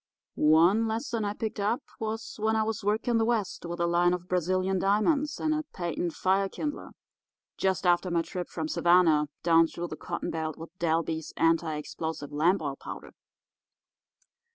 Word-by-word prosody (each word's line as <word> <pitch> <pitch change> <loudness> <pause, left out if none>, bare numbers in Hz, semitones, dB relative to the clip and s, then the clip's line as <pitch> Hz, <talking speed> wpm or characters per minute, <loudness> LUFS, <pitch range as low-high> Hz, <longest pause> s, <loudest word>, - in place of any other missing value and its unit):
One 170 +9 +4
lesson 225 0 -2
I 205 0 -1
picked 215 0 -4
up 215 +7 0 0.2
was 220 0 -4
when 220 +1 +1
I 220 - +2
was 220 -1 -3
working 225 +3 +1
the - - +3
West 220 -6 -1
with 175 0 -5
a 170 - +2
line 175 +1 +3
of 180 0 -9
Brazilian 185 +1 0
diamonds 275 - +1
and 310 -1 +1
a 310 - 0
patent 175 -1 -2
fire 195 +1 +1
kindler 295 +6 -5 0.6
just 190 -1 0
after 175 +1 +3
my 170 -1 +1
trip 180 0 -5
from 160 -2 -3
Savannah 165 -3 +4 0.2
down 165 0 +5
through 170 +1 -6
the - - -5
cotton - - -4
belt 160 -2 -3
with 165 +3 -10
Dalby's 160 -1 -1
Anti 165 -1 +2
explosive 150 -1 -5
Lamp 165 +5 +2
Oil 140 -2 -2
Powder. - - -9
180 Hz, 170 wpm, -28 LUFS, 165-215 Hz, 0.6 s, down